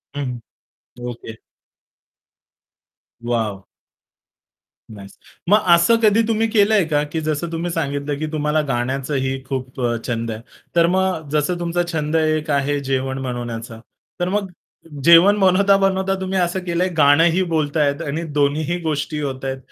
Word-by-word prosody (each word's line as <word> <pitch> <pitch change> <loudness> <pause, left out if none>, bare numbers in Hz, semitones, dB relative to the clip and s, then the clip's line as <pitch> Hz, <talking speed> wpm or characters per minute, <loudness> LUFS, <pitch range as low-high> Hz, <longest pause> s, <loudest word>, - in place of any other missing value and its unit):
हं, 145 - -2
हं. 125 -2 -5 0.7
Okay. 115 -2 -8 1.9
Wow 110 -5 -2 1.3
nice. 100 -2 -12 0.3
मग 210 +2 +6 0.2
असं 170 +7 +4
कधी 215 +1 +5
तुम्ही 225 0 +1
केलंय 210 -2 +3
का 150 -1 +1
की 160 - -2
जसं 155 +2 -2
तुम्ही 170 +1 -3
सांगितलं, 145 -3 -2
की 155 - -2
तुम्हाला 150 0 0
गाण्याचंही 135 +1 -2
खूप 130 -1 -5
अ, 120 -1 0
छंद 115 -1 -2
आहे. 110 0 -6 0.3
तर 170 0 +5
मग 185 -4 0
जसं 155 +4 0
तुमचा 175 0 -1
छंद 155 0 -2
एक 155 -1 +1
आहे 140 +1 0
जेवण 135 0 -2
बनवण्याचा. 120 -2 -5 0.4
तर 175 +1 0
मग 200 -2 -2 0.5
जेवण 170 +6 +7
बनवता-बनवता 195 0 +3
तुम्ही 190 0 -2
असं 175 +1 0
केलंय 175 +1 0
गाणंही 160 +5 +4
बोलतायेत 150 -1 0
आणि 150 +4 -3
दोन्हीही 155 +4 0
गोष्टी 155 -1 -2
होत 135 -2 -4
आहेत. 135 0 -3
155 Hz, 135 wpm, -20 LUFS, 135-175 Hz, 1.9 s, जेवण